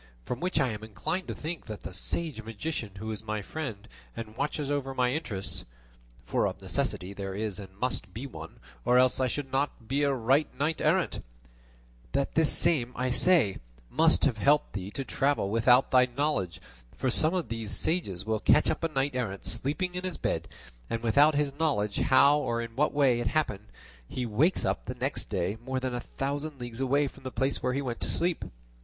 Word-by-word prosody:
From 125 Hz, -, -3 dB
which 180 Hz, -1 st, 0 dB
I 130 Hz, -3 st, +3 dB
am 110 Hz, -1 st, -5 dB
inclined 110 Hz, -, -3 dB
to -, -, -4 dB
think 165 Hz, +2 st, -5 dB
that 110 Hz, -2 st, -7 dB
the -, -, -7 dB
sage 150 Hz, -, -3 dB
magician 115 Hz, -1 st, -4 dB
who 110 Hz, +2 st, -4 dB
is 110 Hz, 0 st, -6 dB
my 110 Hz, -1 st, -3 dB
friend, 115 Hz, -7 st, -5 dB, 0.3 s
and 110 Hz, -1 st, -6 dB
watches 145 Hz, +1 st, -2 dB
over 135 Hz, -2 st, -2 dB
my 125 Hz, -1 st, +2 dB
interests 105 Hz, -11 st, -2 dB, 0.6 s
(for -, -, +1 dB
of -, -, -5 dB
necessity 95 Hz, +2 st, -2 dB
there 95 Hz, -1 st, -5 dB
is 105 Hz, -1 st, -3 dB
and 95 Hz, -1 st, -10 dB
must 125 Hz, -4 st, -2 dB
be 115 Hz, +8 st, -6 dB
one, 135 Hz, -, -9 dB, 0.2 s
or 125 Hz, -, +4 dB
else 130 Hz, 0 st, +4 dB
I 130 Hz, -, +3 dB
should 135 Hz, +1 st, -3 dB
not 135 Hz, -4 st, -1 dB
be 140 Hz, +4 st, +1 dB
a 140 Hz, -1 st, +3 dB
right 135 Hz, +4 st, +3 dB
knight 155 Hz, +3 st, 0 dB
errant), -, -, +1 dB, 0.9 s
that 140 Hz, -, 0 dB
this 160 Hz, -2 st, +4 dB
same, 125 Hz, -7 st, +3 dB
I 125 Hz, +1 st, 0 dB
say, 140 Hz, -, +4 dB, 0.3 s
must 165 Hz, 0 st, +4 dB
have 120 Hz, -6 st, +1 dB
helped 145 Hz, +5 st, +3 dB
thee 95 Hz, -1 st, -4 dB
to 135 Hz, +6 st, -5 dB
travel 135 Hz, -9 st, +1 dB
without 125 Hz, +3 st, +4 dB
thy 125 Hz, -1 st, +6 dB
knowledge; 125 Hz, -, -1 dB, 0.4 s
for 130 Hz, -, 0 dB
some 155 Hz, +7 st, +3 dB
of 180 Hz, -4 st, -2 dB
these 115 Hz, -2 st, -4 dB
sages 100 Hz, -, 0 dB
will 110 Hz, 0 st, 0 dB
catch -, -, +4 dB
up -, -, -4 dB
a -, -, +3 dB
knight 140 Hz, -2 st, 0 dB
errant 100 Hz, -6 st, -3 dB
sleeping 150 Hz, +10 st, -1 dB
in 180 Hz, 0 st, -4 dB
his 185 Hz, -3 st, -3 dB
bed, -, -, -1 dB, 0.4 s
and 115 Hz, 0 st, -2 dB
without 140 Hz, +7 st, +5 dB
his 145 Hz, -1 st, +1 dB
knowing 120 Hz, -11 st, +1 dB
how 140 Hz, +7 st, +5 dB
or 120 Hz, -5 st, -1 dB
in 115 Hz, -1 st, -5 dB
what 150 Hz, +4 st, +2 dB
way 135 Hz, -5 st, +3 dB
it 120 Hz, -, 0 dB
happened, 105 Hz, -7 st, -1 dB, 0.4 s
he 125 Hz, -, -3 dB
wakes 130 Hz, -, +2 dB
up -, -, -1 dB
the 125 Hz, -, -4 dB
next 130 Hz, +3 st, -2 dB
day 95 Hz, +2 st, -2 dB
more 130 Hz, +1 st, -2 dB
than 130 Hz, -1 st, -3 dB
a 120 Hz, -, -1 dB
thousand 140 Hz, +3 st, -4 dB
leagues 120 Hz, -1 st, -6 dB
away 140 Hz, +2 st, +2 dB
from 135 Hz, -, -11 dB
the 130 Hz, -, -5 dB
place 135 Hz, +2 st, 0 dB
where 125 Hz, -, 0 dB
he 140 Hz, +2 st, -1 dB
went 120 Hz, -3 st, -3 dB
to -, -, 0 dB
sleep. 175 Hz, -1 st, +1 dB
130 Hz, 205 wpm, -29 LUFS, 110-145 Hz, 0.9 s, thy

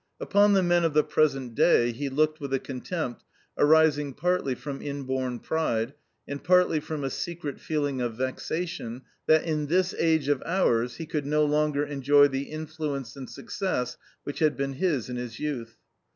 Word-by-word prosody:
Upon 205 Hz, 0 st, +4 dB
the 190 Hz, -1 st, +4 dB
men 175 Hz, -1 st, +3 dB
of 160 Hz, -3 st, 0 dB
the 150 Hz, -, +5 dB
present 135 Hz, -5 st, +1 dB
day 120 Hz, -2 st, +4 dB
he 140 Hz, +4 st, -4 dB
looked 155 Hz, +3 st, +1 dB
with 140 Hz, -1 st, -5 dB
a -, -, 0 dB
contempt 135 Hz, 0 st, -5 dB, 0.3 s
arising 150 Hz, -2 st, +4 dB
partly 180 Hz, -6 st, 0 dB
from 140 Hz, +1 st, -6 dB
inborn 130 Hz, -3 st, -3 dB
pride 120 Hz, -4 st, -1 dB, 0.3 s
and 140 Hz, 0 st, -6 dB
partly 180 Hz, -1 st, +4 dB
from 150 Hz, -1 st, -5 dB
a 135 Hz, -, -2 dB
secret 170 Hz, -5 st, -4 dB
feeling 145 Hz, -4 st, -1 dB
of 120 Hz, -2 st, -2 dB
vexation 130 Hz, 0 st, -3 dB, 0.2 s
that, 155 Hz, 0 st, +5 dB
in 155 Hz, -3 st, -1 dB
this 185 Hz, +3 st, +2 dB
age 160 Hz, -3 st, +2 dB
of 145 Hz, -2 st, +1 dB
ours, 125 Hz, -9 st, +1 dB
he 165 Hz, -, -6 dB
could 150 Hz, -3 st, -3 dB
no 150 Hz, +1 st, +3 dB
longer 150 Hz, -1 st, +1 dB
enjoy 145 Hz, 0 st, +4 dB
the 135 Hz, 0 st, -4 dB
influence 155 Hz, -5 st, -4 dB
and 135 Hz, -2 st, -8 dB
success 125 Hz, -, -3 dB, 0.3 s
which 145 Hz, -, -5 dB
had 155 Hz, -2 st, +2 dB
been 140 Hz, 0 st, -2 dB
his 145 Hz, -, 0 dB
in 125 Hz, -1 st, -5 dB
his 120 Hz, -2 st, -6 dB
youth. 125 Hz, -7 st, -4 dB
145 Hz, 175 wpm, -27 LUFS, 130-160 Hz, 0.3 s, the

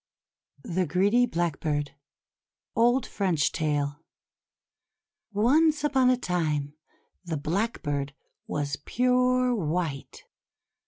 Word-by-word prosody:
THE 180 Hz, 0 st, -1 dB
GREEDY 205 Hz, +9 st, +3 dB
BLACKBIRD 155 Hz, -, -1 dB, 0.8 s
Old 240 Hz, +2 st, +3 dB
French 180 Hz, -7 st, 0 dB
Tale 145 Hz, -2 st, -1 dB, 1.3 s
ONCE 295 Hz, +9 st, +3 dB
upon 265 Hz, -4 st, +3 dB
a 255 Hz, -, +3 dB
time, 155 Hz, -, -1 dB, 0.5 s
the 165 Hz, -3 st, -3 dB
Blackbird 145 Hz, -5 st, -2 dB, 0.3 s
was 145 Hz, -1 st, -2 dB
pure 250 Hz, 0 st, +2 dB
white. 165 Hz, -, -3 dB
180 Hz, 85 wpm, -27 LUFS, 150-245 Hz, 1.3 s, GREEDY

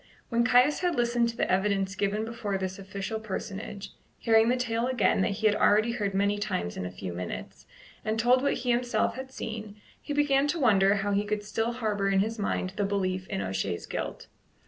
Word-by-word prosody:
When 235 Hz, 0 st, +2 dB
Caius 250 Hz, +4 st, +4 dB
had 355 Hz, -2 st, 0 dB
listened 240 Hz, -1 st, +2 dB
to 230 Hz, -, -7 dB
the -, -, 0 dB
evidence 195 Hz, 0 st, +1 dB
given 205 Hz, +2 st, -1 dB
before 225 Hz, -4 st, -3 dB
this 190 Hz, 0 st, -4 dB
official 195 Hz, +3 st, -4 dB
personage, 200 Hz, -1 st, -6 dB, 0.2 s
hearing 225 Hz, 0 st, +4 dB
the 250 Hz, -, +2 dB
tale 235 Hz, -1 st, -1 dB
again 235 Hz, -7 st, +2 dB
that -, -, +2 dB
he 220 Hz, -, -4 dB
had 210 Hz, -1 st, +5 dB
already 215 Hz, +3 st, +4 dB
heard 205 Hz, -4 st, -2 dB
many 200 Hz, +1 st, +1 dB
times 185 Hz, -, -2 dB
in 90 Hz, -, -3 dB
a -, -, -7 dB
few 90 Hz, -1 st, -6 dB
minutes, 90 Hz, 0 st, -7 dB, 0.4 s
and 220 Hz, +1 st, -1 dB
told 245 Hz, +2 st, +4 dB
what 280 Hz, -, +1 dB
he 250 Hz, 0 st, -1 dB
himself 240 Hz, -2 st, +1 dB
had 260 Hz, +1 st, -7 dB
seen, 215 Hz, -4 st, -6 dB, 0.2 s
he -, -, -7 dB
began 285 Hz, -1 st, +3 dB
to 330 Hz, +3 st, -1 dB
wonder 200 Hz, -6 st, +4 dB
how 200 Hz, 0 st, -1 dB
he 200 Hz, +1 st, +2 dB
could 210 Hz, 0 st, -2 dB
still 225 Hz, +3 st, -1 dB
harbour 210 Hz, -4 st, -1 dB
in 195 Hz, -1 st, +3 dB
his 220 Hz, +2 st, -2 dB
mind 190 Hz, -2 st, -1 dB
the 205 Hz, -, +1 dB
belief 190 Hz, -2 st, -1 dB
in 100 Hz, -, -3 dB
O'Shea's 95 Hz, -2 st, -2 dB
guilt. -, -, -5 dB
210 Hz, 210 wpm, -28 LUFS, 195-235 Hz, 0.4 s, had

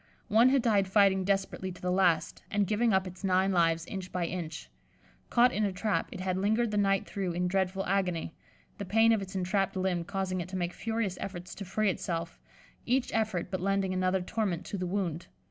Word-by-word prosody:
One 230 Hz, +4 st, +6 dB
had 265 Hz, -2 st, +3 dB
died 205 Hz, -5 st, +3 dB
fighting 190 Hz, -1 st, +4 dB
desperately 195 Hz, -1 st, -1 dB
to 180 Hz, -, -11 dB
the 180 Hz, -, -1 dB
last, 180 Hz, -3 st, +2 dB
and 205 Hz, -1 st, +1 dB
giving 220 Hz, +3 st, +2 dB
up 190 Hz, -1 st, +2 dB
its 185 Hz, +1 st, -9 dB
nine 190 Hz, 0 st, +2 dB
lives 165 Hz, -2 st, +2 dB
inch 185 Hz, 0 st, -6 dB
by 180 Hz, -2 st, -1 dB
inch. 165 Hz, -3 st, -5 dB, 0.6 s
Caught 245 Hz, +1 st, +4 dB
in 215 Hz, -, 0 dB
a 200 Hz, -, +1 dB
trap, 200 Hz, +3 st, -1 dB
it 185 Hz, -, -6 dB
had 185 Hz, 0 st, -1 dB
lingered 220 Hz, +3 st, +1 dB
the 210 Hz, -, -1 dB
night 195 Hz, -1 st, +2 dB
through 190 Hz, -3 st, -3 dB
in 180 Hz, +1 st, 0 dB
dreadful 190 Hz, +1 st, 0 dB
agony, 180 Hz, -4 st, -1 dB, 0.5 s
the -, -, -3 dB
pain 225 Hz, +4 st, +4 dB
of 220 Hz, -3 st, +2 dB
its 195 Hz, 0 st, -7 dB
entrapped 195 Hz, +1 st, 0 dB
limb 185 Hz, -2 st, 0 dB
causing 190 Hz, 0 st, -2 dB
it 175 Hz, -, -7 dB
to 190 Hz, -, -4 dB
make 175 Hz, -1 st, -2 dB
furious 225 Hz, -5 st, -2 dB
efforts 180 Hz, -2 st, -6 dB
to 200 Hz, -, -7 dB
free 200 Hz, +2 st, +1 dB
itself, 170 Hz, -2 st, -4 dB, 0.4 s
each 255 Hz, +1 st, 0 dB
effort 215 Hz, -6 st, -1 dB
but 185 Hz, -2 st, -2 dB
lending 195 Hz, 0 st, 0 dB
another 185 Hz, 0 st, +1 dB
torment 190 Hz, -3 st, -2 dB
to 200 Hz, -, -4 dB
the 180 Hz, -, -2 dB
wound. 175 Hz, -3 st, -2 dB
190 Hz, 210 wpm, -30 LUFS, 180-205 Hz, 0.6 s, One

